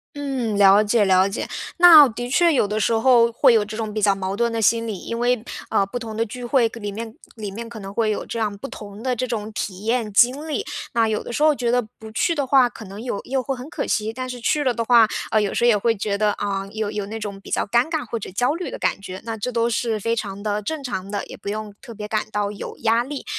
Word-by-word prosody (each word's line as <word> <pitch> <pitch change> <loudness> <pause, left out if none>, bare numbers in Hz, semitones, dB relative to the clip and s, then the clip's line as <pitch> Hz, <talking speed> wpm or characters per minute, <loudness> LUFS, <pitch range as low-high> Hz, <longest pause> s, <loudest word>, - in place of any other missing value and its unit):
嗯， 265 -6 -2
了 200 +1 +7
解 210 0 +2
了 190 0 +4
解， 200 - -4 0.3
那 335 -5 +9
的 245 +1 -5
确 335 +4 +4
有 210 - +2
的 210 +1 -2
时 225 - +1
候， 235 0 +4
会 255 +2 +5
有 215 -2 +3
这 215 - -7
种 220 -1 -3
比 215 - -3
较 205 -1 +4
矛 195 0 -3
盾 235 +2 0
的 225 - -1
心 230 +1 +2
理， 205 -4 -4
因 230 - -5
为， 245 -1 +1 0.3
呃， - - +3
不 245 - -5
同 225 -3 -6
的 225 - +1
聚 245 +3 -7
会 240 -2 +3
可 235 - -10
里 205 -2 -4
面 225 +2 -7 0.2
里 215 -3 -5
面 230 +4 -7
可 230 -1 -9
能 195 -1 -8
会 215 +1 0
有 210 - -3
这 230 - -6
样 210 -2 -1
不 210 +7 -7
同 205 -2 -10
的 255 -1 -1
这 255 - -1
种 220 -3 -4
体 195 0 -5
验 225 -2 0
经 255 +8 +3
历， 315 +6 -2 0.3
那 230 -1 +3
有 215 - -1
的 - - -7
时 290 - -2
候 305 -1 +5
觉 240 -3 -1
得 245 0 +3
不 220 -1 -13
去 330 +9 +1
的 285 -3 0
话， 260 -2 +4
可 225 - -11
能 200 +3 -9
有 240 -4 -3
又 265 0 -1
会 270 +2 -3
很 255 +3 -9
可 285 - -3
惜， 220 +1 -1
但 255 +1 -5
是 250 -1 -6
去 295 +5 +1
了 260 - +2
的 230 -1 -2
话， 235 -2 +6 0.2
呃， 215 - +3
有 205 - -1
时 240 - +1
候 - - +5
也 230 - +5
会 225 +2 +1
觉 200 0 -2
得， 210 +1 +2
啊， 195 -1 -3
有 215 -1 -3
有 205 -2 -4
那 220 +2 -6
种 200 -2 -6
比 - - -12
较 - - 0
尴 240 +7 +2
尬 315 -5 -2
或 230 - -3
者 - - -7
焦 245 +8 +1
虑 350 +2 -4
的 - - -6
感 195 - -1
觉， 185 -1 -7
那 225 -1 -3
这 225 +4 -4
都 230 0 +1
是 225 -1 -1
非 230 +3 0
常 200 -2 -5
地 210 0 -1
正 300 +7 -4
常 195 -7 -4
的， 205 - -3
也 - - -10
不 - - -7
用 210 0 -5
特 255 - -11
别 210 0 -6
感 215 0 -1
到 205 0 -1
有 200 - -8
压 230 +1 +3
力。 280 +2 -7
225 Hz, 310 characters per minute, -22 LUFS, 210-245 Hz, 0.3 s, 那